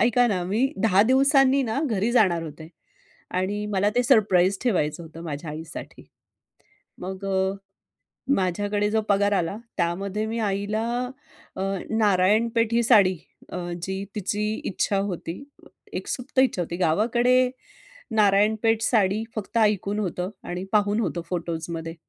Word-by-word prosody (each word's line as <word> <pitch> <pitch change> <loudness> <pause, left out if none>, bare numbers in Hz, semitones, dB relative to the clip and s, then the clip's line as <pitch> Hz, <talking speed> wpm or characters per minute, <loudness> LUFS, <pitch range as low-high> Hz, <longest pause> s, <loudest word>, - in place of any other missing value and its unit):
ऐका 245 +1 +4
ना, 190 -5 0
मी 225 +9 0
10 200 -2 +5
दिवसांनी 270 +2 +4
ना 230 +3 -1
घरी 220 -2 0
जाणार 180 -8 +3
होते. 155 0 -9 0.7
आणि 200 +3 -1
मला 200 +1 +2
ते 245 - +4
सरप्राईज 200 -6 +3
ठेवायचं 175 -8 0
होतं 165 0 -11
माझ्या 150 0 -5
आईसाठी. 160 +2 -8 1.0
मग 190 +2 -6
अ, 190 0 0 0.8
माझ्याकडे 205 +3 0
जो 220 0 +2
पगार 200 0 +3
आला, 185 +2 -1 0.2
त्यामध्ये 195 +5 -1
मी 230 +1 -3
आईला 210 +1 -1 0.7
अ, - - -4 0.3
नारायणपेठी 220 +3 +2
साडी 190 -5 +5 0.3
अ, - - -4 0.3
जी 190 +1 -3
तिची 210 +1 -2 0.2
इच्छा 200 +1 0
होती, 190 +2 -4 0.5
एक - - -4
सुप्त 260 +1 -2
इच्छा 260 -8 +3
होती. 170 0 -4
गावाकडे 240 +8 +3 0.7
नारायणपेठ 215 +2 +3
साडी 215 -1 +2
फक्त 215 +2 -4
ऐकून 210 -1 +2
होतं 180 -1 -2 0.2
आणि 180 +1 -4
पाहून 205 +1 +2
होतं 175 -5 -2
फोटोजमध्ये. 165 -1 -4
205 Hz, 130 wpm, -24 LUFS, 180-225 Hz, 1.0 s, 10